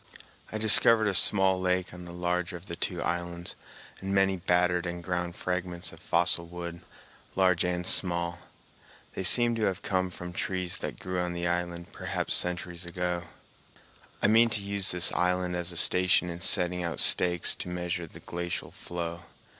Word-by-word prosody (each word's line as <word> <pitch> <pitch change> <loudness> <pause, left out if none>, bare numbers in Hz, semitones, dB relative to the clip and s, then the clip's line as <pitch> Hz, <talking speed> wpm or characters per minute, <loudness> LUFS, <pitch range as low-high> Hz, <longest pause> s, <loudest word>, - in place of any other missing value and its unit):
I 110 - -3
discovered 110 0 +5
a 100 - 0
small 95 0 +5
lake 90 -1 -1
on 90 0 -10
the 85 - -9
larger 90 0 -2
of 85 - -15
the 85 - -6
two - - -3
islands, 85 0 -3 0.5
and 95 +1 -5
many 95 0 +3
battered 90 0 +1
and 85 0 -5
ground 90 0 -3
fragments 90 -1 -4
of - - -14
fossil 85 0 +1
wood, 85 0 -7 0.5
large 90 -2 +3
and 90 0 -2
small. 85 -2 0 0.7
They - - -4
seem 120 +6 +6
to 110 - 0
have 95 - -2
come 95 -2 0
from 90 0 -8
trees 90 -1 -3
that - - -6
grew 90 0 -4
on 90 0 -2
the 85 0 -3
island 85 0 -3
perhaps - - -2
centuries 90 0 0
ago. 90 0 -3 1.0
I - - +4
mean 115 +2 +5
to 105 - -1
use 100 -1 -1
this 90 0 +4
island 90 0 0
as 85 0 -2
a 85 - -6
station 90 0 +4
in 85 +1 -8
setting 90 0 +1
out 85 -1 -3
stakes 90 -2 +3
to - - -6
measure 90 -1 -3
the - - -13
glacial 85 0 -5
flow. 85 -1 -6
90 Hz, 175 wpm, -28 LUFS, 85-90 Hz, 1.0 s, seem